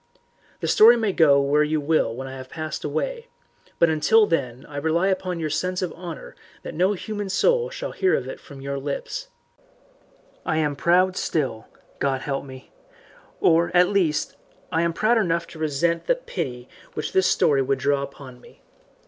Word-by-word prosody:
The - - -1
story 235 +3 +7
may 220 -3 0
go 145 -5 +5
where 140 +2 +2
you 155 +1 +1
will 145 -6 +1
when 135 +2 -6
I 135 - -7
have 130 0 -9
passed 155 -1 -5
away, 465 - -3 0.5
but 170 - +5
until 165 +8 +4
then 130 - -2
I 145 - -9
rely 160 +6 +1
upon 185 -2 -2
your 155 -2 -2
sense 180 +4 -1
of 180 - -3
honour 170 -4 -9 0.3
that - - -7
no 185 +5 +2
human 205 +1 -5
soul 485 - +2
shall - - -5
hear 380 - +2
it 130 +1 -4
from 140 -1 -12
your 140 0 -4
lips. 145 - -4 1.2
I 155 - -1
am 150 -2 0
proud 180 +5 +3
still 130 -8 -2 0.3
God 135 -1 0
help 135 -1 -3
me! 130 -1 -12 0.7
or, 170 +1 +4
at 180 0 +5
least, 180 -7 0 0.4
I 165 -1 +1
am 170 0 +1
proud 220 +7 +2
enough 170 -4 0
to 160 - -12
resent 160 +2 0
that - - 0
pity 125 -8 -5 0.3
which 150 - -4
this 190 -1 +3
story 140 -2 +3
would 135 +1 0
draw 140 +1 +1
upon 135 -2 -9
me. - - -19
160 Hz, 180 wpm, -23 LUFS, 140-185 Hz, 1.2 s, story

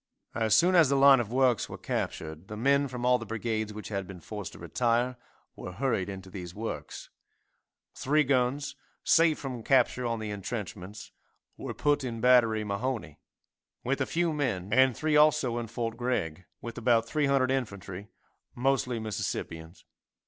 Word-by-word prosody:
As 110 -2 +2
soon 180 +2 +4
as 165 -6 +6
the 140 - +2
line 135 -1 +7
of 115 -2 -3
works 125 -3 +2
were - - -7
captured 80 +3 -4
the 105 - -7
men 140 +4 +3
from 125 -2 -5
all 125 0 +4
the - - -6
brigades 110 -1 -2
which 105 0 -8
had 100 -3 -3
been 95 -1 -9
forced 105 +1 -7
to - - -11
retire 120 +1 0 0.4
were 90 - -8
hurried 100 -4 -1
into 95 -1 -8
these 90 -2 -8
works. 100 -10 -6 0.8
Three 150 +3 +2
guns, 135 +1 0 0.3
saved 165 -2 +4
from 130 -4 -6
capture 125 0 +2
on 115 0 -1
the 110 -1 -5
entrenchments, 100 -1 -6 0.4
were - - -6
put 145 -2 +1
in 120 -3 -4
battery 115 -3 +4
Mahone, 105 - -3 0.7
with 135 +3 -1
a 135 - 0
few 170 -1 0
men, 105 -10 -2
and 130 -1 +4
three 155 -1 +1
also 150 -5 +4
in 115 - -5
fort 115 0 -4
Gregg, 95 -9 -2 0.2
with 120 0 -6
about 115 -1 +3
300 140 -2 +2
infantry, 100 -6 -4 0.5
mostly 125 -1 0
Mississippians. 85 -6 -5
120 Hz, 165 wpm, -29 LUFS, 105-135 Hz, 0.8 s, line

